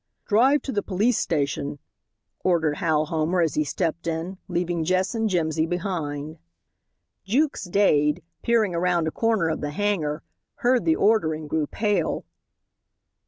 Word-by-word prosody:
"Drive 260 +7 +4
to 270 - -3
the 205 - 0
police 210 +6 +1
station," 145 -2 -1 0.7
ordered 160 -5 +2
Hal 160 -4 +1
Homer 160 +3 0
as 160 -4 +1
he 155 - +1
stepped 170 +2 -2
in, 170 +3 -3
leaving 175 -2 -1
Jess 185 +5 +1
and 225 -1 0
Jimsy 160 -3 0
behind. 160 -5 -3 0.8
Jukes 265 +4 0
Dade, 170 -4 +2 0.2
peering 225 -5 +2
around 170 -1 +1
a - - -1
corner 225 -5 +1
of 160 - -2
the 145 - -2
hangar, 160 -3 -1 0.4
heard 250 0 +3
the 320 - +4
order 205 - +2
and 155 -1 -7
grew 150 0 -1
pale. 205 -3 -1
175 Hz, 145 wpm, -24 LUFS, 155-205 Hz, 0.8 s, Drive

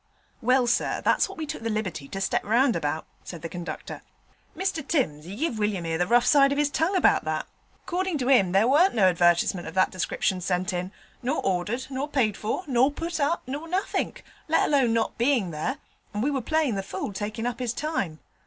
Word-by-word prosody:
'Well, 255 +2 +3
sir, 240 0 +1
that's - - +3
what 390 - -10
we 320 - -3
took 305 -3 -6
the 225 - -2
liberty 200 -10 -3
to 195 - -5
step 195 - 0
round 235 +4 +3
about,' 150 +2 -2 0.2
said 170 -3 -9
the - - -2
conductor. 175 0 -6 0.6
'Mr 380 -4 -1
Timms 160 - 0
'e 195 - -7
give 250 -3 -2
William 205 -5 -1
'ere 165 0 -1
the 175 - +1
rough 240 +2 +4
side 275 +1 +5
of 280 - 0
his 295 -1 +2
tongue 330 +7 +1
about 370 - +4
that: - - -2 0.4
'cordin' 365 -2 -1
to 255 -3 -2
'im 225 -10 +5
there 195 +5 +4
warn't 310 +7 +4
no 215 - +3
advertisement 175 0 +2
of 160 - -8
that 185 - +3
description 185 0 -1
sent 180 0 -1
in, 180 +1 -3 0.3
nor 260 +5 -1
ordered, 195 +7 -1
nor 270 +2 -2
paid 250 -9 +1
for, 220 - -3
nor 260 -1 +3
put 330 +2 -4
up, 295 +4 +1
nor 285 +6 -5
nothink, 370 +4 -2 0.2
let 325 - +3
alone 270 -5 +3
not 225 0 -1
bein' 240 -7 +2
there, 155 - -2 0.4
and 210 - 0
we 290 - +1
was 270 -3 -2
playing 310 -6 +2
the 195 - -1
fool 195 +1 -5
takin' 215 +3 -4
up 245 0 -2
his 245 -3 -1
time. 240 - -2
240 Hz, 215 wpm, -26 LUFS, 190-290 Hz, 0.6 s, side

